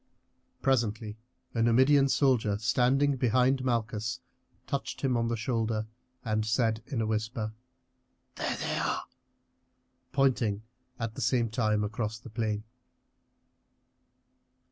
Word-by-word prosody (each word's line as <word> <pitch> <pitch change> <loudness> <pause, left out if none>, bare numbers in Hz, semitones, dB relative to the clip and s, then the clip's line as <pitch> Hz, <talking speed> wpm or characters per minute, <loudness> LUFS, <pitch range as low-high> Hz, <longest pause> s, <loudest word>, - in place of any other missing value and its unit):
Presently 110 -4 0 0.3
a 115 - 0
Numidian 130 +4 +5
soldier 120 -8 +3
standing 130 +5 +2
behind 130 +2 +3
Malchus 115 -1 -1 0.5
touched 140 - -3
him 130 -3 +1
on 115 0 +1
the 115 0 -1
shoulder 110 -1 -1 0.4
and 110 -1 +1
said 110 0 +1
in 130 -6 -2
a - - +1
whisper: 110 0 -2 0.8
"There - - -2
they - - -2
are!" - - -1 1.1
pointing 120 -6 +2 0.4
at 115 -2 -3
the - - -6
same 120 -1 +2
time 110 -3 +1
across 105 +1 -2
the 115 0 -12
plain. 110 -2 -1
115 Hz, 115 wpm, -29 LUFS, 110-130 Hz, 1.1 s, Numidian